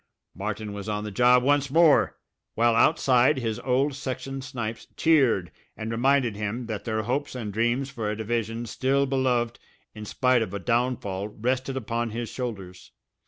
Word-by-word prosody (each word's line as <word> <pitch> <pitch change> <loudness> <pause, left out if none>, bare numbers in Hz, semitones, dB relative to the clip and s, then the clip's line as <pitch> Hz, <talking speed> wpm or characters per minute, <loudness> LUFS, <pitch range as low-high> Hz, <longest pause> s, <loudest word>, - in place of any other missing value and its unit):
Martin 105 +1 -4
was 100 +1 -6
on 105 0 -2
the 105 - -5
job 125 +4 +4
once 145 +1 +2
more, 160 +1 +4 0.4
while 115 +1 +3
outside 130 0 +4
his 115 -4 -2
old 135 +3 +1
section 135 0 -5
snipes 115 -4 -5
cheered, 135 - +3 0.3
and 110 +1 -4
reminded 125 -1 +2
him 105 +4 -3
that 110 -3 -5
their 110 -2 -1
hopes 135 +4 -2
and 110 -5 -5
dreams 120 +5 0
for 115 -5 -3
a 105 - -3
division 115 +1 -2
still 135 +4 +1
beloved 130 -3 0 0.3
in 105 - -8
spite 125 +2 +2
of 100 -3 -3
a - - -3
downfall 115 -3 -1
rested 130 +5 -2
upon 120 -1 -2
his 115 +1 -4
shoulders. 100 -8 -7
120 Hz, 165 wpm, -26 LUFS, 110-130 Hz, 0.4 s, job